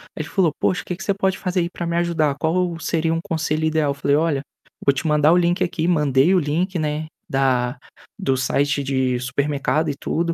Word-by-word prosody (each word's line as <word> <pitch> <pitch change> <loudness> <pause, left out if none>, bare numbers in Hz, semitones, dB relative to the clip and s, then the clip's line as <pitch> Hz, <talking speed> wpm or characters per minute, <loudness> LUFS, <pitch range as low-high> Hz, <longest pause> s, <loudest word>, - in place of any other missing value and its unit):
aí 155 - -3
ele - - -10
falou: 185 -6 +2
"Poxa, 180 - +1
o - - -31
que 180 - -3
você 200 - +1
pode 190 -1 0
fazer 180 0 -1
aí 170 - -1
para 175 - -5
me 170 0 -1
ajudar? 160 -5 +1
Qual 170 +1 0
seria 165 -1 0
um 165 - 0
conselho 160 -1 -1
ideal?". 155 -2 +1
Eu - - -1
falei: 140 0 +1
"Olha, 150 -3 +1 0.4
vou 140 - +5
te 140 - -4
mandar 150 +1 +4
o - - +4
link 175 +1 +1
aqui". 170 -1 0
Mandei 150 +1 +3
o 185 - +5
link, 170 +4 -1
né, 155 0 -2 0.2
da 130 -2 +1 0.4
do 135 -10 0
site 140 +2 +1
de 130 -2 0
supermercado 140 +4 0
e 140 - -2
tudo. 170 +1 -1
155 Hz, 220 wpm, -21 LUFS, 140-170 Hz, 0.4 s, vou